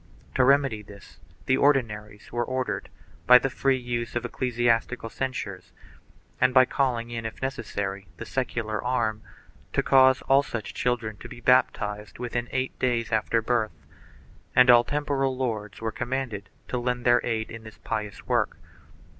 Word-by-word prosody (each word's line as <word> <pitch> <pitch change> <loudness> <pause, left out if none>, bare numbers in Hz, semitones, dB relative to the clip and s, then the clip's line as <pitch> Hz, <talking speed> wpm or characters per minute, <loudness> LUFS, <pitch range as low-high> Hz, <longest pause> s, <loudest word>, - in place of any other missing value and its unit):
To 130 - +3
remedy 135 -4 +3
this 100 -1 -15 0.3
the 130 - +3
Ordinaries 105 -8 0
were 120 0 0
ordered, 130 +1 -3 0.4
by 125 - +10
the 135 +1 -1
free 135 0 +1
use 120 -2 -4
of 120 0 -1
ecclesiastical 120 -1 0
censures, 110 -8 -5 0.7
and 130 0 +3
by 130 0 +8
calling 125 -3 -1
in 115 -1 -4
if 110 - -6
necessary 100 -7 -4
the - - -7
secular 115 -4 -2
arm, 115 -4 0 0.5
to - - +2
cause 130 -1 +5
all 135 +1 +5
such 120 -6 -5
children 120 -4 -1
to - - -10
be - - -10
baptized 105 -4 +1
within 120 0 -3
eight 130 0 -2
clays 120 -3 0
after 110 +1 +1
birth, 115 -2 -1 0.7
and 125 0 +8
all 120 0 +7
temporal 140 -1 -1
lords 110 -6 -3
were 110 0 -2
commanded 120 -5 -4 0.2
to 125 - -1
lend 125 0 -2
their 120 0 +5
aid 110 -2 -2
in 115 - -8
this 110 -1 -12
pious 105 -2 -5
work. - - 0
120 Hz, 155 wpm, -26 LUFS, 110-130 Hz, 0.7 s, by